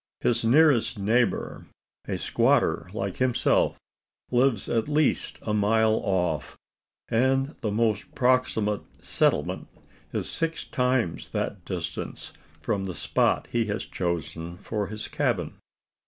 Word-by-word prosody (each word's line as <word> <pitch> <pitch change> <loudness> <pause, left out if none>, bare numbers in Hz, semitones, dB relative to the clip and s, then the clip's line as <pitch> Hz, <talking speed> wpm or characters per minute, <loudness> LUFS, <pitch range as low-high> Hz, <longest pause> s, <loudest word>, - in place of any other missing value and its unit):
His 120 - +1
nearest 130 -1 +4
neighbour 115 +5 0 0.4
a - - -1
squatter - - +2
like - - -3
himself 125 -2 +2 0.5
lives 125 -4 +2
at 115 +1 0
least 150 -1 +1
a 105 - -1
mile 110 +1 +3
off; 90 -6 -1 0.5
and 135 +5 +2
the 110 - -1
most 105 -1 0
proximate 125 -5 +2 0.2
"settlement" - - 0 0.4
is - - -2
six 165 0 -2
times 125 -9 0
that 95 - -2
distance 85 -3 -5 0.3
from 100 -2 -1
the 90 -2 -5
spot - - +1
he 120 -1 +1
has 105 +1 -3
chosen 85 -1 -3
for 105 +1 -3
his 110 +2 -5
cabin. - - -1
110 Hz, 120 wpm, -26 LUFS, 100-125 Hz, 0.5 s, nearest